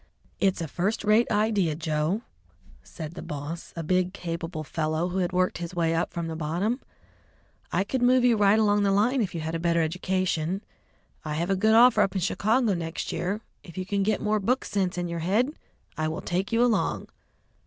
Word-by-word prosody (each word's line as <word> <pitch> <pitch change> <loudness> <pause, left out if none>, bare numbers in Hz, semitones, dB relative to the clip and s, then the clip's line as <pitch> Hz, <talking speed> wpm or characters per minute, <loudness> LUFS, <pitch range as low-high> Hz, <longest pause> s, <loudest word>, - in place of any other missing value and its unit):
"It's 190 -3 +1
a 165 - -2
first 190 +9 -1
rate 215 +3 +4
idea, 205 -7 +2
Joe," 160 +6 -1 0.6
said 155 - -8
the - - -7
boss, 150 +3 -6
a 165 - -4
big, 185 +2 +1
capable 165 -3 -5
fellow 155 +3 -1
who 185 +2 -2
had 180 -2 0
worked 185 0 +1
his 175 +1 -6
way 165 -1 +1
up 165 +1 0
from 170 -1 -3
the 165 -1 -4
bottom. 175 - -1 0.9
"I - - +2
could 250 +5 -2
move 250 0 +4
you 240 -2 +5
right 205 0 +4
along 205 -1 +3
the 200 - +2
line 230 +7 +2
if 185 -5 -2
you 165 - -3
had 160 +1 -4
a 165 - -1
better 170 -1 +2
education. 185 +2 -1 0.6
I 150 -2 -3
have 170 +4 -1
a - - +3
good 220 +3 +3
offer 235 -2 +7
up 195 -1 +1
in 190 - 0
Chicago 220 +5 +2
next 165 -2 -4
year; 200 +5 -2 0.2
if 170 -1 -13
you 185 - -3
can 200 +1 -1
get 210 +1 +1
more 215 0 +1
book 250 +6 0
sense 185 -3 -1
in 175 0 -1
your 170 0 -4
head, 210 - +1 0.4
I 155 -1 -1
will 160 - -3
take 185 +4 -2
you 230 +1 +3
along." 235 -3 0
185 Hz, 205 wpm, -26 LUFS, 165-210 Hz, 0.9 s, offer